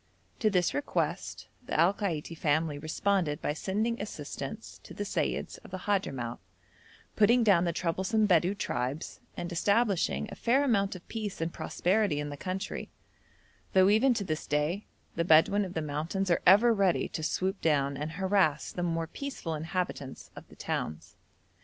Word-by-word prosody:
To 215 - +3
this 180 -4 +2
request 290 - -2 0.2
the 245 - -2
Al 170 +4 +5
Kaiti 170 -6 -3
family 155 -1 0
responded 155 0 0
by 150 - -1
sending 215 +8 -1
assistance - - -6
to - - -12
the - - -3
Seyyids - - -2
of - - -12
the 185 - -5
Hadhramout, 140 - -2 0.8
putting 235 +3 +5
down 190 -5 +4
the 170 - +1
troublesome 190 +6 0
Bedou 180 +1 +3
tribes, 130 -4 -3 0.2
and 175 - -4
establishing 200 +2 +1
a - - -6
fair 260 +4 +2
amount 200 -7 +1
of 180 - -11
peace 215 -4 -4
and 165 +1 -2
prosperity 185 -4 0
in 145 0 -3
the 145 - -5
country, 190 +6 -4 0.8
though 190 0 +6
even 240 +5 +4
to 205 - -1
this 155 -4 -3
day 150 +7 0 0.3
the 170 - +1
Bedouin 170 +5 +5
of 185 -2 -6
the 160 - -1
mountains 160 +6 -2
are 170 - +3
ever 215 +6 +7
ready 195 -4 +2
to - - -5
swoop 190 +5 -1
down 140 -3 +2
and 150 +3 -4
harass 185 -5 +1
the 175 - -4
more 165 -1 0
peaceful 225 - -5
inhabitants 160 -3 -4
of - - -11
the - - -16
towns. 80 +3 -4
180 Hz, 165 wpm, -30 LUFS, 155-200 Hz, 0.8 s, ever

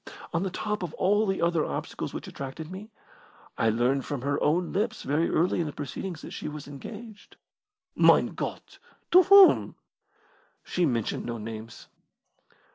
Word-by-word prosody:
On 170 - +1
the 195 - -1
top 210 +3 -3
of 175 -4 -5
all 205 +3 +2
the 190 -3 -1
other 170 -2 +2
obstacles - - -4
which - - -7
attracted 140 +4 -7
me, 200 +4 -8 0.7
I 115 - +2
learned 125 +5 +1
from 140 -4 -5
her 140 +1 -1
own 170 +4 +1
lips 215 +3 -1
very 150 +4 +1
early 175 +2 +1
in 165 - 0
the - - -4
proceedings 150 +5 -6
that - - -8
she - - -6
was 150 -1 -7
engaged." 210 - -10 0.6
"Mein - - +5
Gott! - - -6 0.3
To 365 - +9
whom?" 390 +1 +6 0.9
"She 180 -2 0
mentioned 115 -5 -2
no 120 -1 -3
names." 110 +1 -8
165 Hz, 160 wpm, -27 LUFS, 140-195 Hz, 0.9 s, To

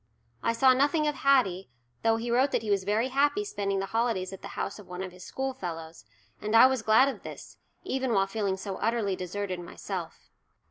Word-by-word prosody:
I 230 - +1
saw 260 +2 +5
nothing 290 +4 +2
of 300 - +1
Haddie, 250 - +2 0.3
though 225 0 +3
he 230 +1 -3
wrote 255 +4 +3
that 225 - +1
he 210 - -2
was 195 -2 +1
very 220 +5 +1
happy 290 +10 +2
spending 200 - -2
the 195 - -1
holidays 225 -5 0
at 195 - -9
the - - -7
house 200 - -3
of 205 - -13
one 180 +1 -5
of 185 - -6
his 180 0 -13
schoolfellows, 170 - -5 0.4
and 215 +1 -1
I 230 - +9
was 260 -2 +2
glad 220 +5 +5
of 275 - -4
this, - - -10 0.3
even 265 -1 -1
while 195 -3 +3
feeling 195 -1 -2
so 190 0 -5
utterly 220 -4 0
deserted 185 0 -4
myself. 175 - -7
215 Hz, 205 wpm, -28 LUFS, 190-260 Hz, 0.4 s, I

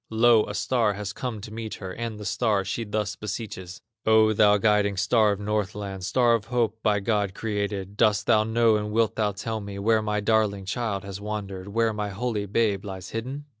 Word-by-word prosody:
Lo! 115 0 +4
a 105 - -5
star 115 0 +1
has 100 0 -5
come 125 -3 -4
to 105 +2 -9
meet 110 -1 -5
her, 95 -2 -7
And 115 -1 -5
the 105 - -7
star 105 -2 +1
she 110 +4 -2
thus 105 -1 -2
beseeches: 100 -4 -6 0.2
"O, 110 0 +5
thou 105 0 +5
guiding 105 -1 +2
star 105 +2 +3
of 100 - -2
Northland, 100 -2 -3
Star 120 +5 +3
of 115 -3 0
hope, 115 -2 -1
by 105 -2 +2
God 100 -2 0
created, 100 -2 -3
Dost 105 -2 +3
thou 110 -2 +4
know 110 0 +3
and 105 0 -3
wilt 115 0 +1
thou 105 -2 +1
tell 110 +2 -4
me 100 -1 -7
Where 110 +2 +2
my 105 -1 -1
darling 105 -2 +1
child 100 -1 -2
has 100 0 -7
wandered, 100 -3 -5
Where 115 +2 +1
my 105 -1 -3
holy 105 0 -2
babe 100 -1 +1
lies 95 -3 -7
hidden?" 130 +6 -5
105 Hz, 205 wpm, -26 LUFS, 100-110 Hz, 0.2 s, O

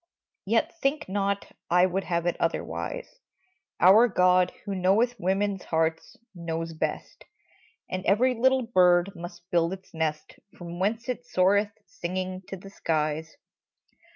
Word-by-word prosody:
Yet 230 +10 +1
think 275 +3 0
not 200 +1 -2 0.2
I 180 +1 +5
would 185 +1 -2
have 170 -1 -1
it 175 - +1
otherwise! - - -3 0.6
Our 205 +7 +7
God, 180 -3 +3
who 200 - -3
knoweth 195 +6 +2
women's 195 +1 -1
hearts, 160 0 -1 0.2
knows 165 -2 -4
best 155 - -4 0.6
And 185 0 -4
every 240 +7 +4
little 260 +2 +2
bird 180 -4 +4
must 175 0 -10
build 170 +1 +2
its 190 0 -11
nest 155 -2 -3 0.2
From 175 0 -8
whence 220 +5 -1
it 245 -1 -4
soareth, 200 +3 +2
singing, 185 +1 -4
to 195 - -6
the 195 +2 -12
skies. 155 -2 -2
185 Hz, 135 wpm, -27 LUFS, 175-205 Hz, 0.6 s, Our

